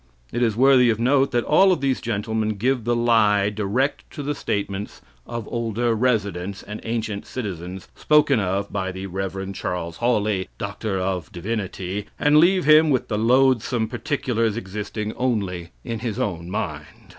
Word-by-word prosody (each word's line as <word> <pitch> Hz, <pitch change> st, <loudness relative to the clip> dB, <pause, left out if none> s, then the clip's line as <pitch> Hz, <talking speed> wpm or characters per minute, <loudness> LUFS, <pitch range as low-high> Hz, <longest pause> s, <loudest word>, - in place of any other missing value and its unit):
It 120 Hz, -, -1 dB
is 115 Hz, -4 st, +2 dB
worthy 130 Hz, -1 st, +6 dB
of 110 Hz, -1 st, +1 dB
note 135 Hz, +3 st, +3 dB
that 120 Hz, -1 st, 0 dB
all 190 Hz, +5 st, +5 dB
of 180 Hz, -, +1 dB
these 135 Hz, -2 st, 0 dB
gentlemen 110 Hz, 0 st, -1 dB
give 125 Hz, +2 st, 0 dB
the 120 Hz, 0 st, +2 dB
lie 105 Hz, -4 st, +3 dB
direct 110 Hz, +7 st, -1 dB
to 145 Hz, -, -5 dB
the 145 Hz, +1 st, -1 dB
statements 100 Hz, -5 st, -4 dB, 0.2 s
of 115 Hz, -2 st, -5 dB
"older 115 Hz, 0 st, -1 dB
residents" 100 Hz, -5 st, -1 dB
and 105 Hz, +1 st, -7 dB
ancient 110 Hz, -3 st, -3 dB
citizens 95 Hz, -6 st, -6 dB
spoken 150 Hz, -4 st, +3 dB
of 100 Hz, 0 st, -2 dB
by 95 Hz, -2 st, -2 dB
the 95 Hz, +1 st, -6 dB
Rev. 95 Hz, +1 st, -4 dB
Charles 85 Hz, -3 st, -4 dB
Hawley, 105 Hz, -5 st, 0 dB
D.D., 95 Hz, 0 st, -3 dB
and 150 Hz, +1 st, +4 dB
leave 180 Hz, +1 st, +4 dB
him 155 Hz, +1 st, +6 dB
with 130 Hz, -4 st, +1 dB
the 105 Hz, -2 st, -1 dB
"loathsome 125 Hz, -1 st, +3 dB
particulars" 120 Hz, -3 st, -1 dB
existing 105 Hz, 0 st, -4 dB
only 100 Hz, -9 st, -1 dB
in 115 Hz, -2 st, -4 dB
his 115 Hz, -2 st, -3 dB
own 85 Hz, -4 st, -3 dB
mind. -, -, -3 dB
110 Hz, 155 wpm, -23 LUFS, 100-125 Hz, 0.2 s, worthy